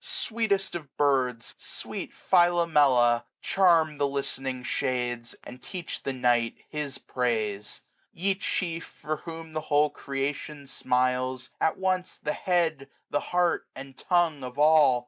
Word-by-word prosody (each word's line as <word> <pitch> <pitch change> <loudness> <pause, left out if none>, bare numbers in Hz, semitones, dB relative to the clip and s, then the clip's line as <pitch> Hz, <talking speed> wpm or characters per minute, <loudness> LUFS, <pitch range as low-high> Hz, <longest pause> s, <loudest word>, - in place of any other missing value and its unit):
Sweetest 225 - 0
of 155 -6 -7
birds! 130 -5 +1
sweet - - -6
Philomela, 150 -10 +4
charm 165 -6 +3
The 145 - +3
listening 135 -2 -3
shades, 120 -2 -2
and 125 +1 -11
teach 175 +4 -6
the 135 - -2
night 120 -2 +2
His 150 -3 -4
praise. 110 -5 -2 0.3
8q - - -19
Ye 195 +2 +3
chief, 170 -3 -2
for 155 +1 -5
whom 165 -1 -9
the 155 - -2
whole 150 0 +2
creation 140 +1 -4
smiles. 130 -1 0
At 160 - +2
once 185 -1 -1
the 150 - -2
head, 165 -7 0 0.2
the. 145 - +2
heart, 175 +1 0
and 135 0 -9
tongue 170 -5 +1
of 125 0 -7
all. 150 -4 +6
145 Hz, 135 wpm, -27 LUFS, 130-170 Hz, 0.3 s, all